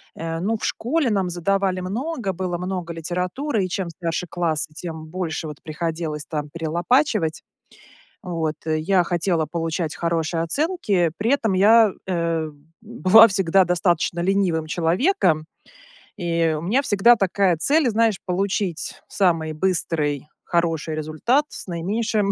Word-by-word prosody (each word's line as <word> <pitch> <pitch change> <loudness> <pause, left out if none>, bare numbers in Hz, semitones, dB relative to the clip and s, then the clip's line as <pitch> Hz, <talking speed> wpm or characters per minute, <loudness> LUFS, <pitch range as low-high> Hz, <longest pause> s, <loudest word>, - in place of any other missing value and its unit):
э, 165 0 -4
ну, 220 +5 0
в - - -5
школе 265 +1 0
нам 195 -3 0
задавали 185 +1 0
много, 230 - -3
было 180 -1 -3
много 180 -1 -4
литературы, 180 - -2
и - - -5
чем 180 -1 -3
старше 165 +1 -3
классы, 160 -3 -1
тем 160 -1 -7
больше, 165 -1 -4
вот, 150 -1 -8
приходилось 160 -1 -4
там 150 -2 -4
перелопачивать. 170 - 0 0.8
Вот. 165 -4 -2
Я 160 +4 +2
хотела 170 -2 0
получать 165 0 -3
хорошие 165 -1 -1
оценки, 205 - 0
при 225 +6 +1
этом 225 -8 +1
я, 215 +3 +6 0.2
э, 165 -3 -1 0.3
была 225 -1 +6
всегда 190 -2 +3
достаточно 175 -1 +1
ленивым 180 -4 +1
человеком, 170 - +1 0.7
и 170 -3 0
у - - -5
меня 220 - +1
всегда 235 0 +5
такая 195 -3 +2
цель, 290 - +3
знаешь, 225 -3 +2
получить 185 -1 -2
самый 165 -5 +1
быстрый, 155 -4 -1 0.2
хороший 165 -2 -1
результат 155 - 0
с 225 0 -8
наименьшим 200 +4 -1
175 Hz, 130 wpm, -22 LUFS, 165-205 Hz, 0.8 s, я